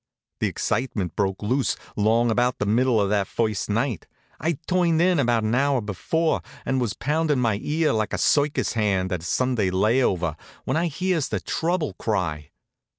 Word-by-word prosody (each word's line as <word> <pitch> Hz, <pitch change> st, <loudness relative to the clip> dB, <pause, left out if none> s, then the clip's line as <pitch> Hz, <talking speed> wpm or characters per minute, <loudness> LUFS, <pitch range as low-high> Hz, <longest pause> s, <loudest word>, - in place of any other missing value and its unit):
The -, -, +1 dB
excitement 100 Hz, -, -2 dB
broke 95 Hz, 0 st, -1 dB
loose 130 Hz, +5 st, +1 dB, 0.2 s
along 115 Hz, +3 st, +2 dB
about 125 Hz, +2 st, +1 dB
the -, -, -1 dB
middle 120 Hz, +2 st, +2 dB
of 100 Hz, -1 st, +1 dB
that 100 Hz, -2 st, +1 dB
first 110 Hz, -3 st, -1 dB
night. 115 Hz, -, -1 dB, 0.3 s
I'd 160 Hz, 0 st, -2 dB
turned 175 Hz, -3 st, +2 dB
in 175 Hz, -1 st, +3 dB
about 120 Hz, -4 st, +2 dB
an 110 Hz, +1 st, 0 dB
hour 140 Hz, +1 st, +2 dB
before, 120 Hz, -, -1 dB, 0.2 s
and 135 Hz, -, 0 dB
I -, -, +2 dB
was 115 Hz, -5 st, -1 dB
poundin' 150 Hz, 0 st, 0 dB
my 115 Hz, -5 st, +1 dB
ear 155 Hz, -1 st, +1 dB
like 110 Hz, -1 st, -1 dB
a -, -, -1 dB
circus 145 Hz, 0 st, +2 dB
hand 100 Hz, -4 st, 0 dB
on 90 Hz, -, -1 dB
a -, -, -14 dB
Sunday 115 Hz, +2 st, 0 dB
lay 105 Hz, +8 st, +2 dB
over, 85 Hz, -, 0 dB, 0.3 s
when 130 Hz, -, -1 dB
I 170 Hz, +2 st, +1 dB
hears 170 Hz, -1 st, -1 dB
the -, -, -1 dB
trouble 165 Hz, -2 st, -1 dB
cry. 80 Hz, -9 st, -2 dB
120 Hz, 185 wpm, -24 LUFS, 105-145 Hz, 0.3 s, in